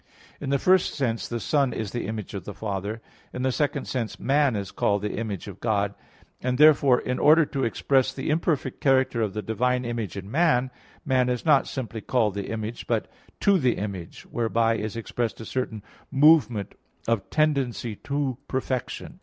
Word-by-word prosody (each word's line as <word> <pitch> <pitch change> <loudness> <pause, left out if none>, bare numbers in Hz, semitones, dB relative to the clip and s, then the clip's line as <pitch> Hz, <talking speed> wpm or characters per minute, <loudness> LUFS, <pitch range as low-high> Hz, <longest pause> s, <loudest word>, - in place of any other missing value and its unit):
In 140 - -4
the 140 - +3
first 185 +5 +3
sense 120 -5 -1
the 120 - -3
Son 140 +2 +1
is 105 -3 -4
the 120 - -3
Image 110 -1 -5
of 100 -3 -5
the 105 - -8
Father; 105 +1 -4 0.3
in 125 - -4
the 130 - +2
second 145 +1 -1
sense 120 -4 -3
man 140 -2 +2
is 100 -2 -4
called 100 0 0
the 105 - -2
image 105 -5 -4
of 100 -1 -9
God; 100 -3 0 0.5
and 125 0 0
therefore 145 -4 +6
in 125 - -2
order 155 +2 +6
to 135 -1 -3
express 130 +3 +2
the - - -3
imperfect 155 -4 -1
character 130 -3 +3
of 105 -3 -1
the 105 - -3
divine 125 +3 0
image 115 -5 -3
in 100 +1 -7
man, 135 -5 +2 0.3
man 130 -2 +2
is 125 -1 -2
not 145 -4 +4
simply 115 -4 -5
called 110 -3 +1
the 100 -1 -4
image, 110 +1 -5
but - - -1 0.3
"to 200 -2 +4
the 125 -5 +2
image," 95 -4 -6
whereby 115 -1 +1
is 110 0 -4
expressed 115 0 -3
a 115 - -7
certain 115 -5 -3 0.3
movement 135 - +4 0.3
of 115 -3 0
tendency 135 -7 0
to 140 -3 -2
perfection. 130 -1 -3
120 Hz, 185 wpm, -25 LUFS, 110-135 Hz, 0.5 s, therefore